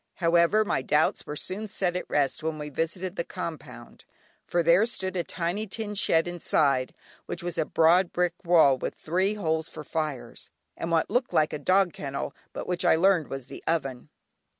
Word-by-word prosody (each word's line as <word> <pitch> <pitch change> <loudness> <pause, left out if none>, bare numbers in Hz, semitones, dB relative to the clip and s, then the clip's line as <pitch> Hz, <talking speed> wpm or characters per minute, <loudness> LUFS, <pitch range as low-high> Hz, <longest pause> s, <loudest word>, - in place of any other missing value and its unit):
However, 170 +5 +3
my 135 - 0
doubts 150 +4 +1
were 150 - -4
soon 195 +7 -4
set 185 -3 -1
at 180 - -4
rest 140 -2 +1
when 160 0 -2
we 150 -1 -6
visited 170 +6 -3
the - - 0
compound, 170 -2 -8 0.4
for 175 -1 +1
there 170 +7 +5
stood 190 -5 -3
a 175 - 0
tiny 180 +7 -3
tin 210 +1 -4
shed, 165 -4 +2
inside 145 -6 +1 0.3
which - - -5
was 175 0 -3
a 160 - +2
broad 170 +4 +4
brick 180 -1 +1
wall, 160 -7 +5
with - - -4
three 185 +6 0
holes 160 -5 -1
for 155 - -9
fires, 145 -6 -4 0.3
and 165 - -4
what 165 -1 +1
looked 250 +1 0
like 155 - +2
a 150 - -3
dog 185 +3 +3
kennel, 140 -1 -5 0.2
but - - -6
which 180 -1 -1
I - - +5
learned 175 -2 +3
was 135 -2 -6
the - - -10
oven. 135 -6 -2
170 Hz, 190 wpm, -27 LUFS, 155-185 Hz, 0.4 s, there